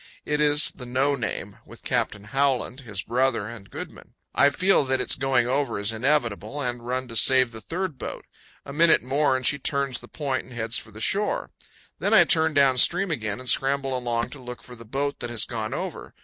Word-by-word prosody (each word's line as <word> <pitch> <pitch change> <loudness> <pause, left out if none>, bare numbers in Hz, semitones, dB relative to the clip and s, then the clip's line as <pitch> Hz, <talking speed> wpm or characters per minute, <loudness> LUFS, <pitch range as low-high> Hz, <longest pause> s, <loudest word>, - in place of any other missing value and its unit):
It 150 0 0
is 150 0 +5
the 125 - -10
"No 130 +3 +1
Name," 125 -6 -4
with - - -13
Captain 105 - -1
Howland, 135 +2 0
his 110 -7 -6
brother, 125 -3 0
and 105 -4 -10
Goodman. - - -9 0.2
I 140 - +5
feel 185 +3 +3
that 130 0 0
its - - -1
going 130 -2 +2
over 135 -1 0
is 100 +1 0
inevitable, 120 -1 0
and 125 -3 -3
run 130 +1 -2
to 115 - -7
save 130 +2 +4
the 110 -1 -9
third 175 -2 -4
boat. - - -6 0.4
A 140 - -8
minute 165 -2 +4
more, 135 +1 +2
and 130 - -6
she 145 - +4
turns 140 -3 0
the - - -13
point 135 -4 -3
and 125 - -13
heads 115 0 -2
for - - -12
the 110 +1 -12
shore. 205 - 0 0.5
Then - - +2
I - - +8
turn 160 -2 +2
down 135 -3 +4
stream 180 +7 +4
again 110 -7 -3
and 130 - -10
scramble 135 +2 +1
along 120 -2 -2
to 140 - -10
look 125 -1 -9
for 125 +2 -11
the 115 0 -13
boat 140 +5 -2
that 120 - -4
has 115 -3 -2
gone 110 -3 -4
over. - - -6
130 Hz, 215 wpm, -25 LUFS, 120-140 Hz, 0.5 s, I